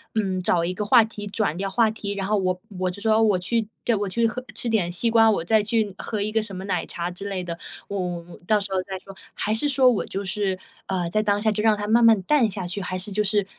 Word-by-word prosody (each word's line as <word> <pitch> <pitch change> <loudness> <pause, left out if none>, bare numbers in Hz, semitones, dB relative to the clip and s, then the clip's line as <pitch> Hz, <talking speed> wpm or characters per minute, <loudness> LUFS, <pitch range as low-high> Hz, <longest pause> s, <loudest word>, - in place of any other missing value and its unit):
嗯， 190 -4 0
找 175 -1 +2
一 170 - -1
个 210 +3 -3
话 230 +2 +7
题、 215 -2 -7
转 200 -5 -1
掉 195 +1 -2
话 225 +3 +3
题？ 205 -2 -4
然 195 -1 -3
后 210 +1 +2
我 185 -2 0 0.2
我 185 0 +1
就 205 - -9
说 220 +1 +3
我 210 -4 +3
去 220 +4 -1 0.2
对， 235 - +2
我 205 -1 -1
去 230 +5 +1
喝 250 +3 -5
吃 240 - -1
点 200 -6 +1
西 205 +7 0
瓜， 225 -1 +6
我 205 -6 +1
再 215 +5 +3
去 215 -2 0
喝 215 -2 -3
一 210 +1 -1
个 220 0 +2
什 205 -3 -7
么 185 - -6
奶 195 - -1
茶 170 0 -4
之 195 +3 -7
类 190 -2 -3
的， 170 -1 -5 0.3
我 200 - -3
我 180 -1 -2 0.2
我 - - -13
到 215 -1 +4
时 200 -1 -5
候 190 -1 +1
再 190 0 -5
说？ 195 +1 -13 0.2
还 210 - -2
是 225 +7 +1
说 270 -3 +4
我 225 - -1
就 195 - -4
是， 190 0 -1 0.3
呃， 180 -3 -2
在 215 +5 +1
当 205 -1 +1
下 220 0 +2
就 210 - -1
让 220 -1 +5
它 205 0 -4
慢 230 +2 +4
慢 225 -2 +6
淡 255 0 +3
下 185 -2 -4
去， 190 +3 -4
还 185 0 -3
是 185 +3 -7
就 210 +2 +1
是， 205 0 +1
205 Hz, 305 characters per minute, -24 LUFS, 185-220 Hz, 0.3 s, 话